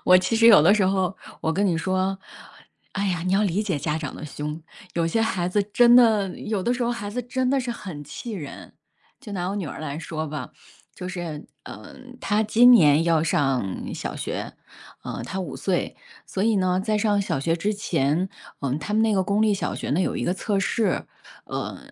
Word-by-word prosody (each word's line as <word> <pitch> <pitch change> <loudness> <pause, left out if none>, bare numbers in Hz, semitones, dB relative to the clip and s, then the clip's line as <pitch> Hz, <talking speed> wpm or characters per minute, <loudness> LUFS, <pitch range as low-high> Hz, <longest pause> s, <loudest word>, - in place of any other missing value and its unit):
我 185 - +7
其 185 +5 0
实 230 +1 +5
有 210 -9 +9
的 170 - +6
时 205 -3 +3
候 190 0 0 0.2
我 160 - 0
跟 200 +5 +1
你 175 -4 +1
说， 185 +3 0 0.8
哎 200 0 -1
呀， 175 -3 -1
你 185 - +1
要 195 +2 +3
理 200 -1 +1
解 195 -7 -1
家 150 +2 -1
长 150 -4 -5
的 - - -8
凶， 150 +1 -6 0.3
有 170 -1 +1
些 195 +7 0
孩 190 -6 0
子 205 +3 +1
真 235 +4 +5
的 220 -5 +5
有 210 -3 -2
的 240 - +1
时 250 - -2
候 240 - 0
孩 205 -4 -5
子 250 +4 -3
真 255 +1 -1
的 275 - +2
是 245 -2 -3
很 185 -10 -7
气 185 - -7
人。 155 -9 -8 0.5
就 225 -7 -9
拿 180 -2 -2
我 200 - -3
女 195 -5 -3
儿 150 - -7
来 150 -1 -4
说 160 -1 -4
吧， 145 -3 -5 0.5
就 180 - -7
是， 175 -5 -6 0.2
嗯 255 -1 -11
她 210 +2 +2
今 230 +3 +6
年 155 -8 +6
要 165 -2 +3
上 135 - -1
小 - - -5
学， - - -4 0.5
呃， - - -5
她 190 - -5
5 185 - -4
岁， 185 -3 -1 0.3
所 190 - -3
以 220 -1 +3
呢， 185 -1 +1
在 215 +1 0
上 210 -1 +2
小 195 - -1
学 165 +5 0
之 205 +5 -1
前， 175 -3 0 0.3
嗯， 140 0 -1
他 205 +7 -4
们 220 - +3
那 225 -1 +3
个 190 -2 +2
公 200 +3 +1
立 215 -1 +3
小 195 - -2
学 - - -5
呢， 155 - +2
有 - - 0
一 - - -2
个 175 - +1
测 200 +2 -1
试。 220 +2 0 0.4
呃， - - -5
190 Hz, 235 characters per minute, -24 LUFS, 165-215 Hz, 0.8 s, 有